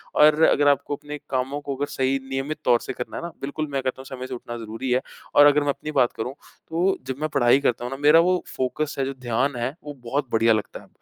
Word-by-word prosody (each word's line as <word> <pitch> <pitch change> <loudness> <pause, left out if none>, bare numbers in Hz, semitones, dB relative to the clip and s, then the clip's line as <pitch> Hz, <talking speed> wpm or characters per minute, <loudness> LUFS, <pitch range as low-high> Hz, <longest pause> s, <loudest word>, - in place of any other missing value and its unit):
और 150 +1 +6
अगर 145 -2 +4
आपको 145 0 +2
अपने 150 +1 -8
कामों 135 +2 -1
को 140 -1 -4
अगर 140 +2 -1
सही 135 +1 0
नियमित 135 +3 -3
तौर 120 -1 +5
से - - -6
करना 125 - -6
है - - -5
ना, 170 - -5
बिल्कुल 145 +3 -3
मैं 135 -1 -1
कहता 130 0 -3
हूँ - - -13
समय 130 -1 -7
से 130 - -6
उठना 120 -1 -6
ज़रूरी 115 +3 -5
है। 125 +1 +3 0.3
और 145 - +9
अगर 145 0 +5
मैं 145 - -1
अपनी 150 +2 -3
बात 125 -5 +3
करूँ, 125 +4 -3 0.4
तो 175 +4 +1
जब 130 - -2
मैं 155 - 0
पढ़ाई 135 -2 +4
करता 120 -4 0
हूँ 125 - -5
ना, 135 - -4
मेरा 150 +3 +6
वो 180 +2 +3 0.2
फ़ोकस 145 +4 -2
है, 135 - +1
जो 135 - -3
ध्यान 125 +1 -1
है, 120 +4 -3
वो 145 0 -7
बहुत 135 +2 -3
बढ़िया 115 0 +4
लगता 105 -1 -3
है। - - -19
135 Hz, 260 wpm, -24 LUFS, 125-145 Hz, 0.4 s, और